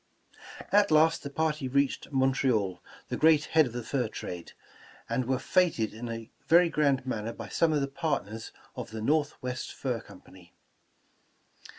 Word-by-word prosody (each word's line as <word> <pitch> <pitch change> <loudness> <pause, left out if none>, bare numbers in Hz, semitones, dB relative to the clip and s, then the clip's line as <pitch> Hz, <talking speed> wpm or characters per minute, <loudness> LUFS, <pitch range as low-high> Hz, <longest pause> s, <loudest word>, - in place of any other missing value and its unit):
' - - -21
' - - -13
At 205 0 +5
last 160 +1 +4
the 140 - -6
party 155 -1 -1
reached 140 +2 0
Montreal, 130 -8 +1 0.3
the - - -2
great 155 -1 +5
head 155 -3 +4
of 120 - -9
the 120 -1 -4
fur 125 +1 -1
trade, 90 -5 -7 0.5
and 120 +2 -1
were 130 0 +1
feted 165 - +1
in 115 +2 -6
a 115 -1 -6 0.2
very 170 +1 +6
grand 140 -4 +1
man 110 -5 -3
ner 115 - -4
by 115 -2 -8
some 165 -1 +2
of 150 -2 +1
the 140 - 0
partners 115 -7 -3 0.2
of - - -6
the 110 0 -6
Northwest 140 -3 -1
Fur 125 -4 -3
Com 95 - -14
pany. 90 -2 -17
130 Hz, 180 wpm, -29 LUFS, 115-155 Hz, 0.5 s, very